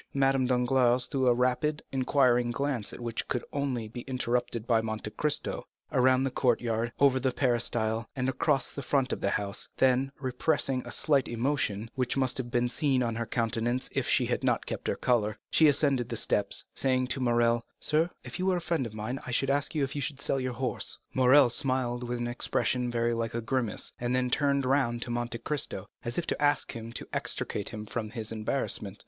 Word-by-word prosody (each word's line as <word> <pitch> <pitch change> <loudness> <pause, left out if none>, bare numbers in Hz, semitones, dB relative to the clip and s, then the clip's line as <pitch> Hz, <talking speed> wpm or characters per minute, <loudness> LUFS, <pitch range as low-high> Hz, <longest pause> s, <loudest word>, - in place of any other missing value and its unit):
Madame 135 -1 +3
Danglars 125 0 +3
threw 130 -1 0
a 120 - +6
rapid 130 +5 +1
and 135 - 0
inquiring 125 -3 +3
glance 125 -3 -2
which 115 -1 -4
could 125 - -2
only 130 -6 -1
be 120 +2 -7
interpreted 120 -3 -1
by 115 -2 +3
Monte 110 -1 -4
Cristo, 150 +6 -1 0.2
around 130 +1 +4
the 135 - 0
courtyard, 120 -2 +1
over 135 -2 +5
the 130 0 +1
peristyle, 115 -3 0
and 130 -1 -1
across 135 +1 +1
the 140 - -6
front 135 -1 +1
of - - -4
the - - +1
house, 100 -1 -2
then, 130 +1 +3
repressing 130 0 0
a - - -6
slight 140 -3 +2
emotion, 115 -3 -1
which 130 0 -1
must 130 -1 +1
have 120 -2 -3
been 120 0 +1
seen 130 0 +1
on 115 -1 -1
her 115 0 -3
countenance 120 +1 0
if - - 0
she - - +3
had - - -1
not - - +1
kept - - -4
her - - +1
color, 110 -4 +1
she 160 - +6
ascended 140 -4 +2
the 115 - -2
steps, 100 -1 0
saying 130 -1 +1
to 135 - -2
Morrel: 120 -1 +2 0.2
"Sir, 160 +3 +2
if - - -7
you 185 - 0
were 185 -1 +3
a - - -1
friend 165 -6 -1
of 110 - -11
mine, 115 +5 -3
I - - -4
should 135 +3 +1
ask 145 +3 0
you 150 - +2
if 135 - -3
you 145 - -2
would 140 -2 -14
sell 135 - +1
your 130 -1 -2
horse." 125 +1 -2 0.2
Morrel 130 0 +6
smiled 125 -2 -1
with 120 - -1
an 120 0 -2
expression 125 +1 0
very 120 0 +1
like 115 0 -2
a 120 - -1
grimace, 120 -2 -2
and 120 +1 0
then 125 -1 0
turned 140 -1 +2
round 130 -3 +1
to 120 - -6
Monte 120 -1 -2
Cristo, 145 +4 -2 0.2
as 120 0 -2
if 175 - 0
to - - -2
ask 145 0 +2
him 115 0 -7
to - - -5
extricate 100 - -2
him 105 -1 -6
from 110 0 -4
his 110 0 -5
embarrassment. 110 -2 -2
125 Hz, 210 wpm, -29 LUFS, 115-135 Hz, 0.2 s, a